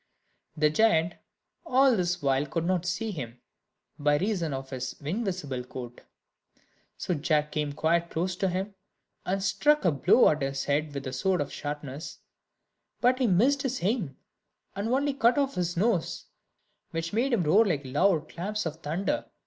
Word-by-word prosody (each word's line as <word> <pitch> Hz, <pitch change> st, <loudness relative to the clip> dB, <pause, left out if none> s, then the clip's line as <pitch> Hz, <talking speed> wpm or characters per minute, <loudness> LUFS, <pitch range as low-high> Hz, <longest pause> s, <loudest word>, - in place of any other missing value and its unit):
The 150 Hz, 0 st, +3 dB
giant 170 Hz, -3 st, +3 dB, 0.5 s
all 270 Hz, -5 st, +4 dB
this 180 Hz, -3 st, -1 dB
while 135 Hz, +1 st, +2 dB
could 165 Hz, +3 st, -2 dB
not 180 Hz, -1 st, 0 dB
see 215 Hz, +5 st, -2 dB
him, 125 Hz, -, -7 dB, 0.6 s
by 145 Hz, 0 st, +3 dB
reason 180 Hz, -3 st, -1 dB
of 135 Hz, 0 st, -5 dB
his 130 Hz, -1 st, -4 dB
invisible 155 Hz, -, -3 dB
coat; 125 Hz, -1 st, -9 dB, 1.0 s
so 180 Hz, -, -2 dB
Jack 150 Hz, -1 st, 0 dB
came 150 Hz, -1 st, -1 dB
quite 170 Hz, +3 st, +1 dB
close 180 Hz, +2 st, -2 dB
to 195 Hz, -, +1 dB
him, 190 Hz, +3 st, -3 dB, 0.5 s
and 190 Hz, +1 st, 0 dB
struck 245 Hz, +10 st, +2 dB
a 175 Hz, -, +5 dB
blow 140 Hz, -3 st, +5 dB
at 155 Hz, -1 st, 0 dB
his 135 Hz, 0 st, -2 dB
head 145 Hz, +1 st, 0 dB
with 140 Hz, 0 st, -4 dB
his 130 Hz, 0 st, -4 dB
sword 190 Hz, +1 st, +1 dB
of 145 Hz, -, -3 dB
sharpness; 145 Hz, 0 st, -6 dB, 0.8 s
but 255 Hz, +1 st, +3 dB
he 255 Hz, -, +3 dB
missed 250 Hz, +9 st, +3 dB
his 265 Hz, -7 st, -3 dB
aim, 185 Hz, -, -1 dB, 0.6 s
and 200 Hz, +3 st, -2 dB
only 280 Hz, +3 st, +1 dB
cut 250 Hz, -1 st, +3 dB
off 275 Hz, -1 st, +1 dB
his 175 Hz, -1 st, -2 dB
nose, 195 Hz, -3 st, 0 dB, 0.6 s
which 165 Hz, +2 st, -4 dB
made 245 Hz, +5 st, +1 dB
him 225 Hz, -7 st, +2 dB
roar 190 Hz, +9 st, +5 dB
like 155 Hz, -10 st, -1 dB
loud 155 Hz, +4 st, +2 dB
claps 210 Hz, +4 st, -4 dB
of 160 Hz, -1 st, -4 dB
thunder. 165 Hz, +5 st, -2 dB
175 Hz, 165 wpm, -28 LUFS, 145-210 Hz, 1.0 s, a